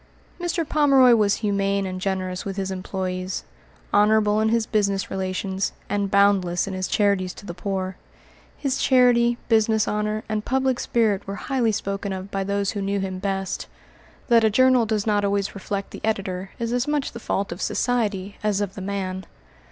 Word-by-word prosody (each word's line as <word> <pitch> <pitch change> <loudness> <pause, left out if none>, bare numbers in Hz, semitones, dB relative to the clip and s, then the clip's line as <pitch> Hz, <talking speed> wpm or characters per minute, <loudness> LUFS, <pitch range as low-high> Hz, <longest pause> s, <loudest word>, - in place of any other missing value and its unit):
Mr. 345 -2 -1
Pomeroy 275 -5 +5
was 210 -3 +3
humane 200 -1 +1
and 185 -1 -5
generous 185 -1 -2
with 195 0 -5
his 190 -1 -2
employés, 185 0 -3 0.5
honorable 210 0 +4
in 220 0 +2
his 230 0 +2
business 200 -3 0
relations, 190 0 -2 0.2
and 205 -1 0
boundless 195 -3 +3
in 195 - -5
his 185 0 -2
charities 200 -3 +1
to - - -12
the 175 - -5
poor. 185 0 -3 0.6
His 270 -2 -1
charity, 240 -2 +4
business 220 -1 +3
honor, 210 +1 -1
and 215 -1 -2
public 260 0 0
spirit 215 -5 +1
were 195 - -4
highly 245 0 0
spoken 200 -1 -3
of 190 +1 -7
by 195 0 -1
those 200 0 -1
who 205 - -4
knew 200 +1 -1
him 190 -1 -3
best. 195 -1 -3 0.6
That 235 -2 +5
a 220 - +5
journal 255 +1 +4
does 215 -2 0
not 205 -2 +2
always 200 0 0
reflect 200 0 -4
the - - -9
editor 195 -3 -2
is 235 0 -2
as 245 +2 0
much 295 -2 0
the 235 - -8
fault 200 -4 -2
of 175 - -6
society 205 -5 -1
as 210 -2 +1
of 200 -2 -2
the 195 - -8
man. 190 -1 -4
200 Hz, 180 wpm, -23 LUFS, 190-220 Hz, 0.6 s, Pomeroy